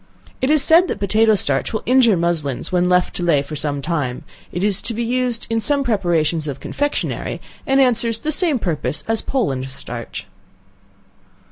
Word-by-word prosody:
It 260 - +1
is 305 -2 +4
said 335 +5 +5
that - - -3
potato 215 +2 +3
starch 140 -8 0
will 220 - -3
injure 245 -5 +4
muslins 165 -6 -1
when 180 0 +1
left 180 0 +1
to 175 - -3
lay 165 -5 +3
by - - -6
for 150 +2 -8
some 145 -1 -1
time, 145 -6 -2 0.3
it 175 - -3
is 200 -2 +5
used 235 +1 -1
in 225 0 0
some 280 +4 +1
preparations 170 - 0
of 135 -2 -5
confectionary, 290 0 -3 0.3
and 270 0 +3
answers 235 -3 +2
the 305 +7 -3
same 310 -2 +2
purpose 155 - -2
as 225 -1 +1
Poland 135 - -2
starch. 130 - -8
205 Hz, 170 wpm, -19 LUFS, 155-250 Hz, 0.3 s, said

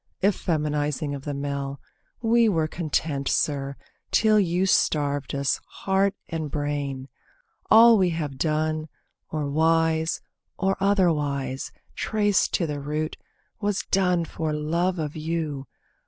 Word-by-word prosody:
Effeminising 150 -6 0
of 140 - -9
the 145 - -2
male. 140 0 -3 0.4
We 230 0 +4
were 160 -5 +1
Content, 155 -4 -2
sir, 140 -2 0 0.3
till 215 -1 +4
you 180 -1 +1
starved 145 -7 +1
us, 140 0 0 0.2
heart 195 +1 +2
and 160 -3 -3
brain. 145 -2 -3 0.6
All 230 0 +8
we 185 -2 +3
have 150 -5 -4
done, 155 0 0 0.4
or 150 -2 -2
wise, 160 +2 +2 0.4
or 195 0 +1
otherwise, 150 -9 +1 0.2
Traced 205 -2 +1
to 170 - +1
the 150 -2 -3
root, 150 +2 -3 0.4
was 205 -2 -1
done 180 -3 +2
for 160 -1 -3
love 170 +5 0
of 155 -2 -3
you. 155 -4 -3
155 Hz, 125 wpm, -25 LUFS, 145-185 Hz, 0.6 s, All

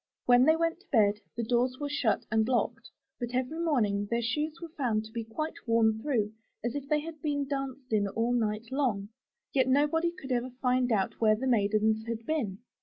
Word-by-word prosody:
When 245 +1 +6
they 315 - +6
went 330 +1 0
to 400 - -25
bed, 210 -5 +4 0.2
the 235 - -1
doors 250 +2 +1
were 290 - -2
shut 285 -6 0
and 220 0 +2
locked, 235 -1 -1 0.3
but 240 0 -4
every 260 +6 -1
morning 215 -11 +1
their 235 0 0
shoes 300 +7 -1
were 335 -1 -7
found 225 -6 0
to 220 - -12
be 230 0 -3
quite 310 +9 -4
worn 220 -1 +3
through 220 -7 0 0.3
as 235 0 -1
if 285 -1 -5
they 300 0 +2
had 315 -1 -8
been 285 -2 -1
danced 270 -3 -4
in 205 -2 +3
all 230 +4 0
night 220 0 -1
long; 235 -8 0 0.4
yet 260 -2 +3
nobody 295 +5 +2
could 275 -6 -9
ever 250 +1 0
find 250 -1 +2
out 200 -1 0
where 215 -1 +5
the 245 +5 -4
maidens 220 -2 +2
had 230 0 -4
been. 235 -12 -1
245 Hz, 205 wpm, -29 LUFS, 220-285 Hz, 0.4 s, When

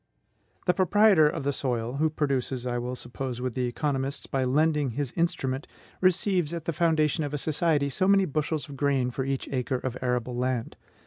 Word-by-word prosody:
The 180 - +4
proprietor 190 -4 +5
of 155 -1 -4
the 140 +1 0
soil, 125 -1 -2
who 155 +2 +2
produces, 135 -4 -1
I 120 -1 -1
will 125 +1 -3
suppose 125 0 -5
with 125 -1 -2
the 125 0 -1
economists, 135 +1 -2
by 135 -1 -1
lending 150 +1 +2
his 140 0 -3
instrument, 135 -5 -1 0.3
receives 185 -3 +2
at 165 -2 -6
the 165 - -1
foundation 155 -1 +2
of 145 0 -3
a - - 0
society 150 0 +1
so 185 +8 0
many 195 -1 +5
bushels 155 0 -2
of 140 -2 -9
grain 135 -3 +1
for 130 +1 -3
each 135 -1 -2
acre 130 -1 -1
of 125 -1 -4
arable 125 -1 -1
land. 125 -1 -2
140 Hz, 190 wpm, -27 LUFS, 125-160 Hz, 0.3 s, proprietor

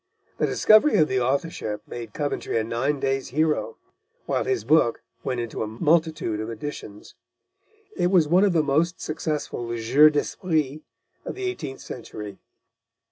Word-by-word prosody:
The - - +2
discovery 215 +8 +5
of 155 - +4
the 130 -2 0
authorship 130 -4 -2
made 120 -1 -7
Coventry 145 -5 -2
a 110 - +1
nine 130 +6 -1
days' 135 0 -1
hero, 155 - 0 0.5
while - - -1
his 395 -2 0
book 135 -7 +3 0.2
went 125 -2 -2
into 120 -2 -4
a 110 - -1
multitude 155 -2 +1
of 110 +1 -4
editions. 110 -3 -8 0.8
It 175 - +1
was 180 -4 +4
one 180 +5 +4
of 200 -3 +3
the 160 -2 +3
most 155 +5 +1
successful 150 -6 -3
jeux 135 +7 +6
d'esprit 155 -1 -1 0.4
of - - -6
the 390 - -6
eighteenth 260 - -4
century. 105 -4 -8
145 Hz, 150 wpm, -24 LUFS, 120-160 Hz, 0.8 s, jeux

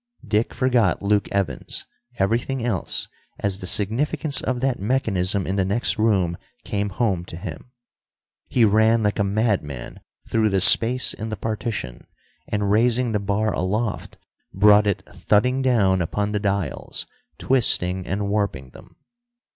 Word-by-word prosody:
Dick 110 +2 0
forgot 125 -6 +1
Luke 100 0 +1
Evans, 90 -11 -3 0.3
everything 115 +5 -1
else, 105 -7 -1 0.3
as 100 -2 -2
the 90 - -7
significance 140 - 0
of 130 -1 -2
that 130 -1 -1
mechanism 100 -4 0
in 95 +2 -2
the 95 - +2
next 105 +4 -1
room 95 -6 +1 0.3
came 100 0 -2
home 95 -3 -1
to 85 - -9
him. 90 +4 -8 0.8
He 120 -3 +3
ran 110 +2 +3
like 105 0 0
a - - +3
madman 100 - -2 0.3
through 110 -1 +1
the 95 -1 +1
space 120 +6 +6
in 110 +1 -6
the 110 - -4
partition, 105 - -5 0.4
and, 105 -1 -1
raising 120 +2 +2
the 105 - 0
bar 100 +2 -1
aloft, 105 +4 -3 0.3
brought 105 +1 +5
it 100 - -1
thudding 125 +6 +1
down 100 -8 +2
upon 100 +5 -2
the 105 - -1
dials, 100 - -3 0.3
twisting 95 -8 +2
and 100 +1 -2
warping 100 -11 -2
them. - - -16
105 Hz, 145 wpm, -22 LUFS, 95-115 Hz, 0.8 s, space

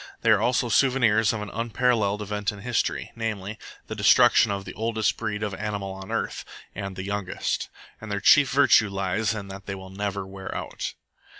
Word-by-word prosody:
They 115 - +4
are 105 -1 +4
also 120 +1 +2
souvenirs 115 -3 +3
of 110 -2 -3
an 105 - -8
unparalleled 115 -2 0
event 105 0 -2
in 100 -1 -10
history, 120 +1 -1
namely, 110 -2 -4 0.3
the - - -6
destruction - - +5
of 100 -1 -3
the - - -7
oldest 110 -1 0
breed 105 +1 -3
of 105 -2 -2
animal 100 -1 -4
on 95 0 -9
earth, - - -2 0.3
and 100 -1 -5
the 95 - -5
youngest. 100 -1 -2 0.3
And 110 -1 -7
their 100 - -1
chief 140 +7 +6
virtue 130 -6 +5
lies 100 +3 -1
in 100 -2 -6
that 95 0 -9
they 95 - -3
will 95 0 -10
never 100 0 -3
wear 95 0 -8
out." - - -5
105 Hz, 190 wpm, -25 LUFS, 100-110 Hz, 0.3 s, chief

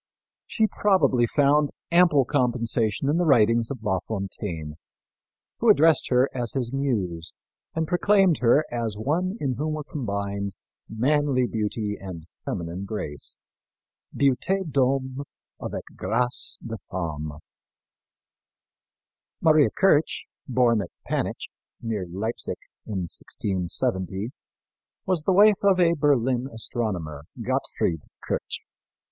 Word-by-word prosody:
She 220 - +2
probably 190 - +3
found 145 +2 +3 0.2
ample 170 -6 +5
compensation 120 -3 +1
in 150 +3 +2
the 175 - +2
writings 115 -6 +4
of 130 -5 -6
La 95 -4 +1
Fontaine, 95 -6 -4 0.9
who 235 - +3
addressed 160 -6 +5
her 125 +1 +4
as 120 -3 -3
his 125 -2 -2
muse 95 - -2 0.4
and 160 -1 0
proclaimed 190 -1 +3
her 125 +5 +4
as 115 -4 -2
one 175 - -1
in 135 -3 0
whom 155 +1 -1
were 155 - -4
combined 100 -7 -3 0.4
manly 135 +2 +2
beauty 105 -2 -2
and 90 -5 -7 0.2
feminine 85 +3 -4
grace 100 -9 -4 0.7
beauté 165 +8 +1
d'homme 130 0 +1 0.4
avec - - -4
grace 120 +5 -1
de 115 -1 -4
femme. 80 -4 -4 2.1
Maria 155 -3 +5
Kirch, 190 -7 +2 0.2
born 120 -4 +3
at 90 - -6 0.2
Panitch, - - -2 0.3
near 110 -6 -3
Leipsic, 110 +7 -3 0.3
in 100 -4 -2
1670, 95 +3 -2 0.7
was 175 -5 0
the - - +3
wife 205 +2 +6
of 195 -2 +4
a 170 -1 +5
Berlin 130 -4 +2
astronomer, 95 - -3
Gottfried 80 -3 -1 0.3
Kirch. - - -3
120 Hz, 115 wpm, -25 LUFS, 100-150 Hz, 2.1 s, wife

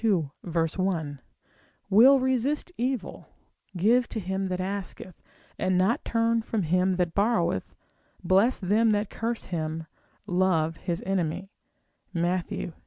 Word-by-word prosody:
1; 165 -3 -1 0.7
will 245 +8 +7
resist 260 +6 0
evil, 245 -5 -3 0.5
give 235 +7 +3
to 225 - -3
him 190 0 -2
that 185 -1 -3
asketh, 190 -2 -5 0.4
and 185 -1 +1
not 190 +6 +2
turn 230 0 +1
from 220 -2 -2
him 180 +3 +2
that 175 -2 0
borroweth, 200 -4 0 0.5
bless 195 +8 +3
them 215 +4 +2
that 210 -1 0
curse 230 +1 -3
him, 160 -2 -4 0.4
love 170 -3 +1
his 175 -2 -4
enemy, 190 0 -2 0.6
Matt. 175 +1 0
190 Hz, 115 wpm, -27 LUFS, 175-225 Hz, 0.7 s, will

